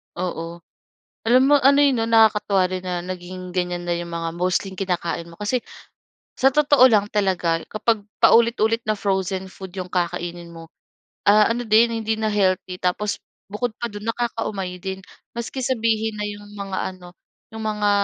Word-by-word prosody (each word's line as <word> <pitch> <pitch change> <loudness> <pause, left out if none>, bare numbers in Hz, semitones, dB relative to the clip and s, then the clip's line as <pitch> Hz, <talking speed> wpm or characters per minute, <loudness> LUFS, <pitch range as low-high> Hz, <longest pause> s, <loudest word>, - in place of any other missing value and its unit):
Oo, 170 -1 -5 0.6
alam 250 +3 +6
mo 290 - +7
ano, 280 +1 +5
eh, 285 - +5
'no 225 -1 0
nakakatuwa 210 -4 +4
rin 185 0 -4
na 180 -1 -2
naging 185 0 -7
ganyan 180 -1 -2
na 175 - +1
'yong 170 0 -6
mga 165 0 -2
mostly 185 +2 0
kinakain 175 -3 -2
mo 170 - -13
kasi, 210 +5 0 0.8
sa 265 - +5
totoo 285 -3 +6
lang 205 -3 +3
talaga 185 -5 +1
kapag 220 +1 0 0.2
paulit-ulit 230 -1 +4
na 215 - +2
frozen 190 -1 -1
food 190 -2 -10
'yong 185 -1 -6
kakainin 175 -1 -3
mo, 165 0 -11 0.6
ah, 210 +1 +6
ano 240 +1 -2
din 225 +2 +5
hindi 220 0 0
na 220 0 0
healthy, 185 -2 0
tapos 195 +3 -1 0.3
bukod 220 +3 -2
pa 235 - -2
do'n 205 +1 -8
nakakaumay 220 -6 -3
din, 190 0 -5 0.3
maski 235 +3 -5
sabihin 225 -3 0
na - - -2
'yong 205 0 -9
mga 195 -2 -5 0.2
ano, 180 -1 -14 0.5
'yong 220 0 -6
mga 210 -1 0
200 Hz, 165 wpm, -22 LUFS, 180-225 Hz, 0.8 s, mo